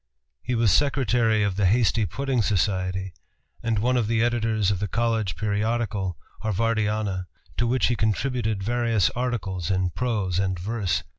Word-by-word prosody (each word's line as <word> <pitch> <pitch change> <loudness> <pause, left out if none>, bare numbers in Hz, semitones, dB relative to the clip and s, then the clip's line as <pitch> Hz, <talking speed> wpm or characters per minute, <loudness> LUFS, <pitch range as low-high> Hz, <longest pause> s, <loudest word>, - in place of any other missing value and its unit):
He 125 - -2
was 115 -3 +3
secretary 120 - +2
of 100 -2 -1
the 100 -2 +3
Hasty 110 0 +2
Pudding 130 - -1
Society, 95 -1 0 0.5
and 115 -2 0
one 125 +5 +2
of 115 -4 +1
the 115 0 +2
editors 110 -4 +1
of 95 - -1
the 105 - -1
college 115 -6 0
periodical 105 -2 -1 0.2
Harvardiana, 105 -3 0 0.3
to 120 - +1
which 130 +2 +2
he 120 - +2
contributed 110 -1 0
various 115 -2 +1
articles 100 -9 -2
in 95 -2 +1
prose 105 -7 -1
and 95 -1 0
verse. 95 -1 -1
110 Hz, 150 wpm, -25 LUFS, 95-120 Hz, 0.5 s, was